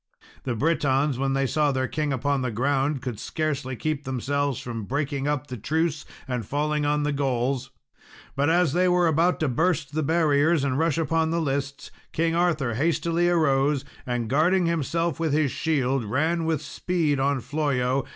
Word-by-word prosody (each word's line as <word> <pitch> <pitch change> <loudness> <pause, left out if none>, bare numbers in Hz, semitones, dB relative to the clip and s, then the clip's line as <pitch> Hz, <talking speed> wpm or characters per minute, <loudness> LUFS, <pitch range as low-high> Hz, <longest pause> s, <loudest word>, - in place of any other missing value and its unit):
The 125 -3 -1
Britons, 140 -1 +1
when 135 0 0
they 135 0 +1
saw 150 +2 +1
their 130 -1 -1
king 150 +3 -2
upon 140 +1 0
the 125 - -1
ground, 135 +4 0
could 120 -5 -4
scarcely 140 -4 -2
keep 150 +3 -2
themselves 140 +1 -1
from 115 -3 -5
breaking 140 +2 -2
up 145 -2 -1
the 125 -3 -7
truce 155 +5 -1 0.2
and 125 -3 -2
falling 150 +5 -1
on 150 0 +1
the 150 - 0
Gauls. 135 -1 -1 0.7
But 140 +3 +2
as 170 -3 +3
they 180 +2 +3
were 180 0 +3
about 165 +3 +2
to 155 - +2
burst 155 +2 0
the 155 - 0
barriers, 155 0 +2
and 135 0 0
rush 165 -1 +1
upon 165 0 +1
the 165 +1 0
lists, 140 -1 -3 0.2
King 165 0 +1
Arthur 165 -8 +1
hastily 170 +5 +1
arose, 145 -4 +2 0.2
and, 120 -2 -2
guarding 175 - +3
himself 165 -1 -1
with 160 -3 0
his 150 -3 +2
shield, 135 -3 0
ran 160 +9 0
with 160 -2 -1
speed 150 0 -1
on 140 0 +1
Flollo. 130 -1 -1
145 Hz, 175 wpm, -25 LUFS, 135-160 Hz, 0.7 s, as